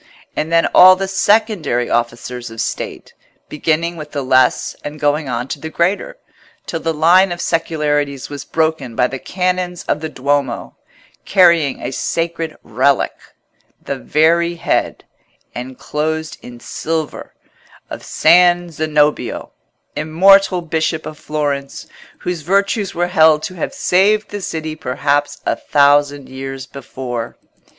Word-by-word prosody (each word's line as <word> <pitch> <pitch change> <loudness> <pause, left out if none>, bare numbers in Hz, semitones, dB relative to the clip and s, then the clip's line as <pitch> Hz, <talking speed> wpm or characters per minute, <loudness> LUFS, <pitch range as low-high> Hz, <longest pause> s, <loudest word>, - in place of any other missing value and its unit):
And 160 - -2
then 165 0 +4
all 185 +1 +9
the 195 +1 -3
secondary 195 - +1
officers 120 +1 -2
of 115 0 -10
State, 115 - -4 0.4
beginning 165 +3 -1
with 150 -1 -9
the 140 -2 -2
less 130 -1 +2
and 150 +1 -7
going 145 -1 0
on 125 +1 -2
to - - -4
the 160 - -6
greater, 195 - -1 0.5
till 165 - -4
the 165 0 -1
line 175 +5 +4
of 175 - -4
secularities 150 -5 -1
was 145 -1 -7
broken 155 -7 -1
by 125 - +3
the 135 +1 -4
Canons 180 0 -2
of - - -1
the 160 0 -5
Duomo, 140 -3 -2 0.5
carrying 170 -7 +4
a - - -3
sacred 165 +3 -3
relic—the 130 +5 -3
very 170 - +2
head, 165 - -1 0.5
enclosed 150 +5 -4
in 120 -1 -11
silver, 160 +4 -4 0.6
of - - -6
San 175 +1 +4
Zenobio, 150 -1 0 0.4
immortal 185 +4 +4
bishop 160 0 -1
of 155 - -8
Florence, 145 -2 -3 0.3
whose 180 -2 -4
virtues 200 +4 0
were 175 +1 +1
held 160 -3 +4
to - - -4
have 175 - -4
saved 205 +3 +2
the 205 0 -5
city 160 -3 -4
perhaps 145 +1 -1
a - - +1
thousand 145 -1 +2
years 135 0 -7
before. 125 -3 -6
155 Hz, 130 wpm, -17 LUFS, 140-175 Hz, 0.6 s, all